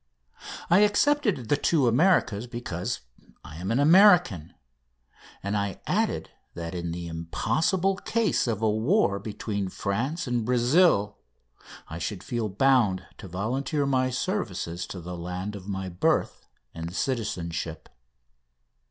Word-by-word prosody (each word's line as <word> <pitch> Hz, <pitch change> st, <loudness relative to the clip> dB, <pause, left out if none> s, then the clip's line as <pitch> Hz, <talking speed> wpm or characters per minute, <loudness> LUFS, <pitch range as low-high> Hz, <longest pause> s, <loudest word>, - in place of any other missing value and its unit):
I 180 Hz, -, +7 dB
excepted 210 Hz, -, +2 dB
the -, -, +4 dB
two 145 Hz, -2 st, +2 dB
Americas 125 Hz, -, +2 dB
because 120 Hz, -8 st, -4 dB, 0.4 s
I 75 Hz, -, -10 dB
am 90 Hz, +3 st, -4 dB
an 115 Hz, +4 st, +1 dB
American, 165 Hz, -, +5 dB, 0.9 s
and 100 Hz, +1 st, -2 dB
I 100 Hz, -2 st, -2 dB
added -, -, -1 dB, 0.2 s
that 85 Hz, 0 st, -5 dB
in 85 Hz, -1 st, -3 dB
the 85 Hz, 0 st, -5 dB
impossible 160 Hz, -, 0 dB
case 225 Hz, -, 0 dB
of 115 Hz, -2 st, -2 dB
a 110 Hz, -, +4 dB
war 110 Hz, -, +2 dB
between 100 Hz, -1 st, -4 dB
France 120 Hz, -, -2 dB
and 120 Hz, -3 st, -1 dB
Brazil 120 Hz, -, +3 dB, 0.7 s
I 80 Hz, -, -7 dB
should 90 Hz, +2 st, -4 dB
feel 115 Hz, -3 st, -2 dB
bound 105 Hz, -4 st, +2 dB
to -, -, -9 dB
volunteer 130 Hz, -, -1 dB
my 130 Hz, -2 st, +1 dB
services 100 Hz, -, -3 dB
to 95 Hz, -, -7 dB
the 90 Hz, +1 st, -7 dB
land 90 Hz, +4 st, -5 dB
of 95 Hz, -1 st, -10 dB
my 95 Hz, -1 st, -3 dB
birth 90 Hz, -1 st, 0 dB, 0.3 s
and 85 Hz, +2 st, -6 dB
citizenship. 85 Hz, -, -3 dB
110 Hz, 130 wpm, -26 LUFS, 90-140 Hz, 0.9 s, I